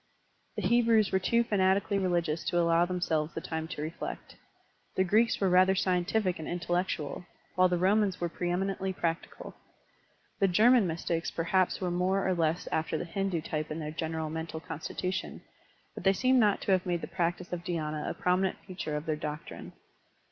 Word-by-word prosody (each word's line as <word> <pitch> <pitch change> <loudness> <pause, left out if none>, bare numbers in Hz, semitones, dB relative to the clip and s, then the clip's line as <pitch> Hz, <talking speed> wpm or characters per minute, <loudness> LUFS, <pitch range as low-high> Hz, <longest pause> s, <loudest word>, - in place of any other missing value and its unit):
The - - -3
Hebrews 230 -3 +3
were 190 - +2
too 235 +5 +2
fanatically 200 -1 +2
religious 170 -4 0
to 175 - 0
allow 170 0 +4
them 180 0 -3
selves 155 -2 0
the - - -1
time 160 0 -4
to 150 -3 -5
reflect. 160 +2 -6 0.6
The 190 - +3
Greeks 220 +5 +3
were 195 - +2
rather 185 +1 +5
scientific 185 +1 +1
and 155 - -6
intellectual, 175 -2 -2 0.3
while 185 0 +4
the 180 - +1
Romans 195 +1 +2
were 175 - 0
pre 175 +1 -3
eminently 190 +1 -1
practical. 165 -1 -4 0.9
The 195 - +4
Ger 215 +7 +5
man 240 -7 +5
mystics 165 0 -2
perhaps 180 +2 +1
were 180 -2 -1
more 185 +3 +1
or 185 - +2
less 165 0 0
after 160 0 0
the - - -4
Hindu 190 -1 -2
type 155 -1 -3
in 155 - -4
their 155 -2 -4
general 160 0 -3
mental 160 0 -4
constitution, 180 +4 -4 0.5
but - - -8
they 195 0 +5
seem 255 +6 +3
not 210 -3 +3
to - - -1
have 185 -1 +2
made 175 -1 0
the - - -5
practice 175 0 -2
of 175 -1 -4
dhySna 155 -4 -3
a - - -4
prominent 185 +1 +1
feature 180 -5 -4
of 150 +1 -4
their 155 - 0
doctrine. 150 0 -7
180 Hz, 185 wpm, -30 LUFS, 165-190 Hz, 0.9 s, rather